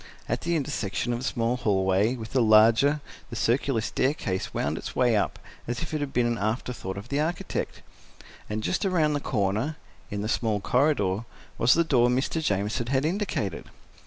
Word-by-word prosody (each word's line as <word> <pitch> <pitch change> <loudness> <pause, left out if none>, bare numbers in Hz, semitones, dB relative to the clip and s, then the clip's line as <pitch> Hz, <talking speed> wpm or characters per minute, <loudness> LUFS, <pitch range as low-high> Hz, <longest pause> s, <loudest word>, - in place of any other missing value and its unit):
At - - -1
the 170 0 0
intersection 120 -5 -1
of 120 - -2
the 130 - -5
small 120 -1 0
hallway 100 +1 +2
with 110 -3 -8
the 130 - +3
larger, 115 +7 +5 0.3
the 120 - -6
circular 115 +3 +1
staircase 110 -6 -1
wound 75 +3 -1
its - - -7
way 125 -3 +3
up, 105 - 0 0.3
as 120 +6 -2
if 160 - -6
it 155 - 0
had 145 -2 -3
been 125 -2 +2
an 120 -1 0
afterthought 110 -2 -3
of 100 +5 -8
the 140 - 0
architect. 160 +3 -3 0.7
And 110 +1 -3
just 185 - 0
around 165 -6 +2
the 145 - 0
corner, 110 +5 -1 0.3
in 100 0 -3
the - - -2
small 110 -2 0
corridor, 110 -3 +1 0.3
was 120 +4 +5
the 170 - +4
door 125 -6 +3
Mr. 130 +6 0
Jamieson 105 +1 0
had 135 +2 +1
indicated. 165 - -2
120 Hz, 185 wpm, -26 LUFS, 105-140 Hz, 0.7 s, larger